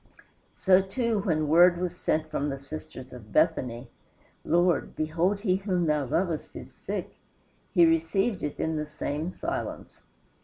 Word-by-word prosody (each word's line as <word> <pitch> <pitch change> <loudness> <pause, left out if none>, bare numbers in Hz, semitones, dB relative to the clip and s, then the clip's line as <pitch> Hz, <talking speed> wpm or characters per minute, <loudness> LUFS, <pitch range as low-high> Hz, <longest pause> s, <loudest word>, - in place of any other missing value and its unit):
So, 190 0 +5
too, 220 +3 -1
when 155 -6 0
word 175 +3 +6
was 180 0 -3
sent 155 -2 -1
from 145 -1 -1
the 135 - -3
sisters 140 -2 -9
of 110 -4 -12
Bethany, 120 +2 +1 0.5
"Lord, 175 +1 +2
behold 170 +6 0
he 190 -4 +2
whom 185 -3 0
thou 150 -2 +1
lovest 165 +4 -2
is - - -9
sick," - - -6 0.5
he 175 - +6
received 165 +5 +1
it 150 - -4
in 160 0 -1
the 150 - -2
same 150 +1 -3
silence. 335 - -5
165 Hz, 150 wpm, -27 LUFS, 150-185 Hz, 0.5 s, word